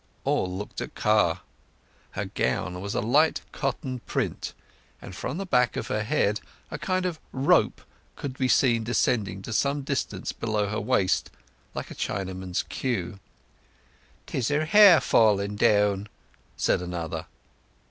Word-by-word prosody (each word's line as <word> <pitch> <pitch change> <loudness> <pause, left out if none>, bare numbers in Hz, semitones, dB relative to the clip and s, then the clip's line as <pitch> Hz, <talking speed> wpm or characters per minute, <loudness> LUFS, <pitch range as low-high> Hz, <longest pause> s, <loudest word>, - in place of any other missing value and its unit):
All 90 - 0
looked 95 +3 -5
at - - -6
Car. 105 -5 +2 0.7
Her - - -3
gown 90 0 -2
was 100 +1 -4
a - - +1
light 145 +9 +3
cotton 130 -2 -3
print, - - -2 0.4
and 90 - -10
from 130 - -4
the 195 - -3
back 125 - +2
of 110 - -4
her 105 - 0
head 105 0 +1 0.3
a - - -5
kind 185 -1 0
of 170 -3 -2
rope 135 +1 +2 0.3
could 135 -3 -5
be 130 -1 0
seen 120 -3 +3
descending 110 - 0
to 115 - -5
some 140 +6 +1
distance 135 0 -2
below 105 -3 -1
her 105 - -2
waist, 100 -4 +1 0.5
like - - -5
a - - -5
Chinaman's 95 -2 -3
queue. 100 -7 -3 1.1
"'Tis 125 -3 -2
her 150 +1 +1
hair 200 0 +8
falling 105 -2 +3
down," 105 -1 +2 0.5
said - - +2
another. 85 -2 -4
110 Hz, 145 wpm, -26 LUFS, 95-135 Hz, 1.1 s, hair